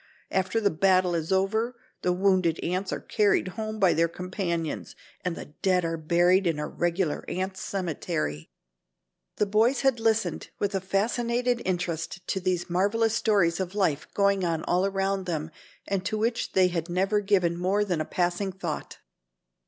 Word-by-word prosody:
After 190 +4 +1
the 205 -2 +2
battle 185 +1 +3
is 165 0 -2
over 220 +6 +1 0.3
the 180 - +1
wounded 185 -3 +2
ants 185 +2 -1
are - - -2
carried 205 -3 +2
home 215 +3 -5
by 190 -4 +4
their 165 +1 +3
companions 170 -2 -3 0.3
and 180 -2 -1
the 145 - -9
dead 185 -2 +2
are 165 0 -1
buried 175 +4 +3
in 165 -3 +1
a 150 - -2
regular 175 -2 -1
ants' 190 +1 -3
cemetery." 80 - -3 0.9
The 210 - +2
boys 220 +6 +2
had 270 -4 +2
listened 225 0 0
with 205 0 -1
a 195 - 0
fascinated 235 +5 0
interest 175 -1 -3
to 190 - 0
these 180 -1 -1
marvelous 205 +5 +1
stories 200 -7 +2
of 190 +1 -3
life 160 -8 +1
going 200 -1 +3
on 165 -2 0
all 180 +2 +2
around 195 -1 -1
them 160 -2 -3 0.4
and 195 -2 -1
to 215 +2 -1
which 230 +2 -1
they 185 -1 +4
had 170 -1 -3
never 195 +4 +1
given 190 -4 +2
more 190 +4 +1
than 175 -5 -1
a - - +1
passing 180 +4 -1
thought. 175 -4 -5
185 Hz, 170 wpm, -27 LUFS, 175-200 Hz, 0.9 s, by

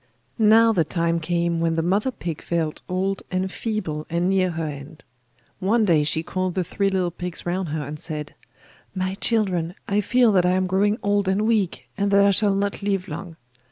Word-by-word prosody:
Now 225 +1 +6
the 175 -5 +3
time 170 +1 0
came 170 0 0
when 165 0 +1
the 165 - 0
mother 200 +8 +1
pig 170 - -5
felt 165 -3 -2
old 190 +1 -1
and 185 +1 -1
feeble 185 -11 -3
and 175 +3 +1
near 185 -1 +2
her 165 -1 -3
end. 145 +1 -8 0.6
One 215 +4 +2
day 165 -6 +4
she 155 +2 0
called 185 +1 -2
the 185 - +1
three 195 +3 0
little 185 -2 0
pigs 180 0 -5
round 175 0 -2
her 150 0 -2
and 150 +2 -7
said: 150 -2 -6 0.6
'My 185 0 -1
children, 185 -7 0
I 205 +1 +1
feel 240 +3 +3
that 185 -3 +4
I 180 +1 +3
am 185 0 +1
growing 200 +3 +1
odd 205 -1 +1
and 190 +2 +1
weak, 215 -6 0
and 200 0 +1
that 200 0 +5
I 200 - +5
shall 200 0 +3
not 200 +1 -1
live 195 -2 -1
long. 180 -3 -7
185 Hz, 200 wpm, -23 LUFS, 170-200 Hz, 0.6 s, Now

